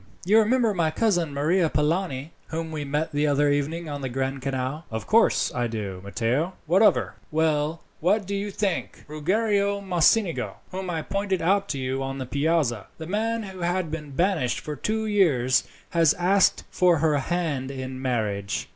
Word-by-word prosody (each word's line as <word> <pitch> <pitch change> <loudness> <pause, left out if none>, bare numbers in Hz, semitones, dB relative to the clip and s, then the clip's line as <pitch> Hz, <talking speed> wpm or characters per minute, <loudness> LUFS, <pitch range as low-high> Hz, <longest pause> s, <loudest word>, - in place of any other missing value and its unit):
"You 210 +4 +5
remember 225 0 +3
my 170 -4 +1
cousin 175 -3 +1
Maria 160 +5 +2
Polani, 150 -2 -1 0.2
whom 160 0 -4
we 155 -2 -3
met 150 +3 -2
the 145 +1 +1
other 145 0 +3
evening 155 +4 -1
on 145 -1 -5
the 130 - -3
Grand 135 +1 -2
Canal?" 135 +3 -3
"Of 110 -1 -4
course 230 +1 +3
I 120 -1 0
do, 100 -5 -5
Matteo. 120 - -1
What 180 +5 +3
of 215 - +7
her?" - - -4
"Well, 155 0 0 0.2
what 195 +5 +2
do 200 - -4
you 200 +1 -2
think? 200 -2 -2
Ruggiero 200 +6 +1
Mocenigo, 175 - +2 0.2
whom 185 0 -4
I 165 -2 -2
pointed 195 -1 -1
out 200 +3 +2
to 140 - -2
you 130 0 -2
on 135 0 -3
the 130 - -4
Piazza 140 - 0
the 160 - -7
man 225 +5 -1
who 190 -2 -9
had 175 -1 -1
been 150 -2 -5
banished 160 -3 0
for 150 - -6
two 220 +6 -2
years 145 - +3 0.3
has 165 -3 +4
asked 185 +2 +3
for 180 -2 +4
her 150 -1 +2
hand 150 -4 -2
in 130 -1 -6
marriage." 105 -6 -2
160 Hz, 180 wpm, -25 LUFS, 135-190 Hz, 0.3 s, of